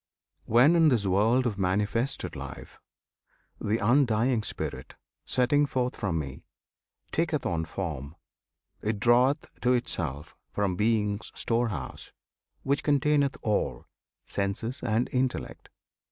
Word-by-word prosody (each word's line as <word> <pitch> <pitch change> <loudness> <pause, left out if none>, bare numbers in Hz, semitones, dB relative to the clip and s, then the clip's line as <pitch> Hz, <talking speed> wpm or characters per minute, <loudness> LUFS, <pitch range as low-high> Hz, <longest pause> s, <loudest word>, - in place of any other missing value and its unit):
When, 125 +9 +5
in 165 -2 +6
this 115 -7 +2
world 110 +7 +3
of 105 -4 -1
manifested 105 +7 0
life, - - -9 0.8
The 105 +2 0
undying 120 0 +3
Spirit, - - -5 0.3
setting 145 +4 +3
forth 125 -2 -1
from 90 -5 -1
Me, 70 -3 -5 0.7
Taketh 160 -2 0
on 80 -2 -1
form, 80 -5 -5 0.7
it 105 -1 -1
draweth 125 +7 +3 0.2
to 125 +1 +3
itself 75 - -2 0.2
From 100 -3 0
Being's 105 0 0
storehouse, 115 - -2 0.5
which 140 +1 +1
containeth 145 -1 +2
all, 105 -3 -1 0.4
Senses 100 +6 -3
and 115 +1 +1
intellect. 130 0 -2
115 Hz, 110 wpm, -28 LUFS, 100-130 Hz, 0.8 s, in